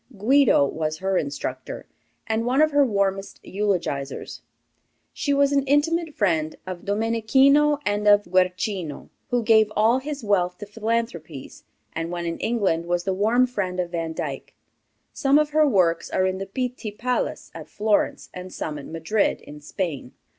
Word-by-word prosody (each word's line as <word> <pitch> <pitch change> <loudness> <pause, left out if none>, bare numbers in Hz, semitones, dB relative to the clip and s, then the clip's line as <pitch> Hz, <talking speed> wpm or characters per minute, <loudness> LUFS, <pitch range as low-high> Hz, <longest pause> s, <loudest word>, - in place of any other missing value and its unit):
Guido 250 - +4
was 155 +2 -3
her 190 +2 -1
instructor, 140 -5 -4 0.4
and 220 +1 -1
one 250 +3 +1
of 310 0 +4
her 290 0 +4
warmest 200 -4 -1
eulogizers. 180 -9 -3 0.7
She 285 - -2
was 280 0 +3
an 280 -1 +3
intimate 310 +3 +1
friend 160 -6 0
of 185 0 -7
Domenichino 230 +8 +3
and 205 0 0
of 205 0 +6
Guercino, 185 -2 -1 0.2
who 245 -1 0
gave 220 -1 +4
all 225 +4 +3
his 285 -1 -6
wealth 180 -4 +1
to 205 - -8
philanthropies, 210 - -4 0.3
and 165 +1 -3
when 175 0 -4
in 170 0 -3
England 190 -8 0
was 175 0 0
the 190 - -1
warm 225 +6 +3
friend 190 -7 -3
of 175 -1 -2
Vandyck. 165 -2 -5 0.6
Some 275 0 +3
of 300 0 +1
her 305 0 +4
works 180 -9 +2
are 185 - +1
in 185 0 -1
the 195 - -5
Pitti 250 +1 -4
Palace, 245 +4 -3
at - - -10
Florence, 210 0 0
and 180 0 -8
some 150 -2 -5
at 140 - -9
Madrid, 165 +6 0
in 150 0 -12
Spain. 150 -5 -4
205 Hz, 160 wpm, -24 LUFS, 175-245 Hz, 0.7 s, of